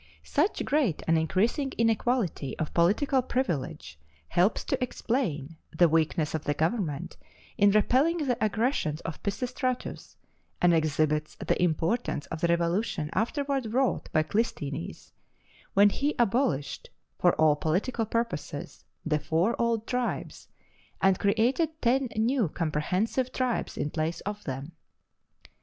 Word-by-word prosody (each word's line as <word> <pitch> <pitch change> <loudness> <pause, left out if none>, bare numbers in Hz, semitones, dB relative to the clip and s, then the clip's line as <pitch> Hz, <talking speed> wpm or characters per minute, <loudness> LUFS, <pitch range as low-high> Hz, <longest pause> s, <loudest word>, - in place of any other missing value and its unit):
Such 320 +8 0
great 275 - +1
and 165 - +4
increasing 215 - +1
inequality 225 - 0
of 155 - -3
political 220 - +3
privilege 140 - -3 0.3
helps 185 +5 +2
to - - -1
explain 170 - -2 0.2
the 175 - +6
weakness 160 0 +1
of 155 -1 -3
the 145 - 0
government 160 -3 -1 0.4
in 205 0 +5
repelling 255 - +3
the 260 -8 -1
aggressions 215 - 0
of 160 - -6
Pisistratus, 250 +4 -3 0.4
and 175 -1 +4
exhibits 155 -1 +1
the - - -1
importance 175 +1 0
of 165 -1 -4
the 170 - +3
revolution 170 0 0
afterward 260 - -1
wrought 265 0 +1
by 155 - +3
Clisthenes, 145 - -3 0.6
when 200 +1 +6
he 290 +7 -1
abolished 215 - 0 0.3
(for - - +4
all 155 -1 +4
political 210 - -1
purposes) 230 -11 -3 0.2
the 155 -1 +1
four 160 +9 +1
old 230 -2 +1
tribes, 250 0 -3 0.5
and 190 -1 +3
created 255 +10 +1
ten 255 +2 +2
new 225 - +2
comprehensive 180 - -1
tribes 255 -2 -1
in 145 - -2
place 165 +1 -2
of 205 +1 -6
them. 135 +3 -5
200 Hz, 125 wpm, -28 LUFS, 155-245 Hz, 0.6 s, the